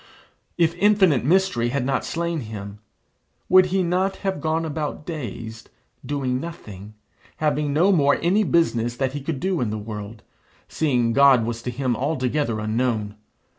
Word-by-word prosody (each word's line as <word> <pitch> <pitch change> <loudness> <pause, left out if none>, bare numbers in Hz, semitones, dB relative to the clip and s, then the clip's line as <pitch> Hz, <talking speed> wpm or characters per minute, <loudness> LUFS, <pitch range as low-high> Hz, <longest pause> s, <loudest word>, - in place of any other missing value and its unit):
If 170 -1 +3
infinite 190 - +4
mystery 150 -7 +2
had 130 0 -1
not 135 - 0
slain 170 0 -2
him, 105 -4 -8 0.7
would 185 0 +6
he 190 +1 0
not 185 +3 0
have 190 -6 -1
gone 160 +1 0
about 150 -1 -4
dazed, 115 - -7 0.3
doing 130 -3 -2
nothing, 105 - -9 0.4
having 150 -1 0
no 170 +7 +3
more 145 -6 +4
any 195 +5 +2
business 120 - +1
that 130 0 -1
he 145 - -4
could 145 0 -3
do 185 -2 -1
in 120 - 0
the 110 - -3
world, 105 0 -8 0.4
seeing 125 -7 0
God 135 -3 +5
was 115 0 -4
to 125 - -4
him 125 0 -1
altogether 130 -3 -1
unknown? 110 -1 -1
140 Hz, 155 wpm, -23 LUFS, 115-165 Hz, 0.7 s, would